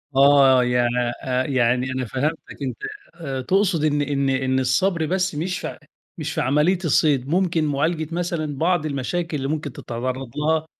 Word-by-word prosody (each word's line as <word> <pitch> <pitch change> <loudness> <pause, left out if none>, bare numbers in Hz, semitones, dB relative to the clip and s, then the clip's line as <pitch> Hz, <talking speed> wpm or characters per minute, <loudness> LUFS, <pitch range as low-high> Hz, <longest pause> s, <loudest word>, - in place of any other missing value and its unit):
آه، 135 -2 +6
يعني 125 -1 +2 0.3
أ 130 0 0
يعني 125 -1 +1
أنا 130 0 -2
فهمتك، 145 +8 -1 0.2
أنت 130 -4 -3 0.4
آآ، 140 -6 -4
تقصد 185 +2 +1
إن 150 -1 +2
إن 140 -1 0
إن 130 0 +1
الصبر 160 +7 +1
بس 185 0 0
مش 180 +4 -2
فع - - -6 0.4
مش - - -4
في - - -1
عملية 150 +8 +2
الصيد، 140 -4 +2
ممكن 170 -1 +1
معالجة 155 +2 0
مثلًا 165 -5 -2
بعض 170 +1 +1
المشاكل 155 +3 -2
اللي 135 -1 -3
ممكن 150 -2 -3
تتعرض 130 +2 -4
لها 155 +1 +1
145 Hz, 160 wpm, -22 LUFS, 130-160 Hz, 0.4 s, آه